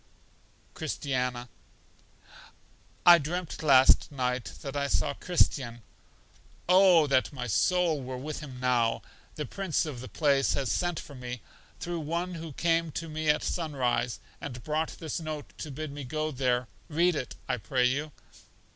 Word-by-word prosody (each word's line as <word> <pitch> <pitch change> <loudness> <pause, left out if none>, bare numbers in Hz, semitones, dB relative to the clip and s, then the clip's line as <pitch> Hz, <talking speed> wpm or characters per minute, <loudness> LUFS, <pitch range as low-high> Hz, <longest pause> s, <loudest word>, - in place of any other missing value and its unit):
Christiana: 125 -3 -2 1.6
I 175 -1 +10
dreamt 170 +3 -4
last 135 -3 +6
night 125 -2 -1 0.2
that 135 0 -5
I 140 0 0
saw 140 0 +1
Christian. 130 -9 0 0.8
Oh, 180 -3 +7
that 135 -1 +2
my 130 -4 -5
soul 165 - +2
were 130 0 -5
with 150 +4 -5
him 135 -5 -9
now! 120 -3 +1 0.3
The 150 - -3
Prince 190 +3 -1
of 145 -6 -5
the 130 - -8
place 140 -3 +2
has 135 -6 -1
sent 175 -2 0
for 145 - -10
me, 125 -3 -7 0.4
through 175 -1 -3
one 170 +4 -2
who 165 -3 -7
came 165 +1 +1
to 165 0 -4
me 155 0 -2
at 150 - +3
sun 160 -4 -2
rise, 120 -2 0 0.2
and 125 -4 -6
brought 155 +1 -2
this 160 0 -4
note 155 -3 -6
to 155 - -5
bid 150 +2 -5
me 145 0 -6
go 155 +4 -2
there; 125 -2 0 0.2
read 170 +2 +3
it, 130 - -4
I 125 - 0
pray 125 +3 +1
you. 145 +4 0
145 Hz, 155 wpm, -29 LUFS, 125-160 Hz, 1.6 s, I